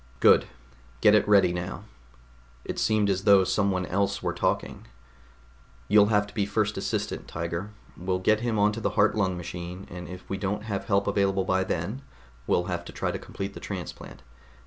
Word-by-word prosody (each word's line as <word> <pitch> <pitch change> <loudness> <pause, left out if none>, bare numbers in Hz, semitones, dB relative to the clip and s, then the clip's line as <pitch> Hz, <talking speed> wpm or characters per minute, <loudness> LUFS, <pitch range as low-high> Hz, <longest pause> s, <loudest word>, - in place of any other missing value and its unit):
"Good. - - +5 0.5
Get 105 - +6
it 105 - +4
ready 100 -4 +5
now." 90 +3 -5 0.8
It - - -4
seemed 110 -2 +2
as 95 -1 0
though 100 -2 +7
someone 95 -1 0
else 100 +3 -1
were - - -1
talking. - - -2 1.0
"You'll 105 0 +6
have 105 -1 +2
to 100 - -14
be 105 - 0
first 105 0 0
assistant, - - -3
Tiger. 85 +4 -4 0.3
We'll 90 +1 -1
get 105 +4 +2
him 115 -1 -1
onto 105 +2 +2
the - - +1
heart 105 +1 +4
lung 95 -4 0
machine, 90 +2 -7
and 90 0 -7
if 90 -1 -10
we 95 - -3
don't 105 +2 -2
have 105 -3 -3
help 100 -1 +2
available 100 -1 +1
by 95 0 +1
then, 95 +8 -3 0.5
we'll 90 - +2
have 90 -1 -3
to - - -8
try - - -2
to - - -4
complete 100 +1 -6
the - - -8
transplant. 90 -8 -7
100 Hz, 185 wpm, -27 LUFS, 90-105 Hz, 1.0 s, though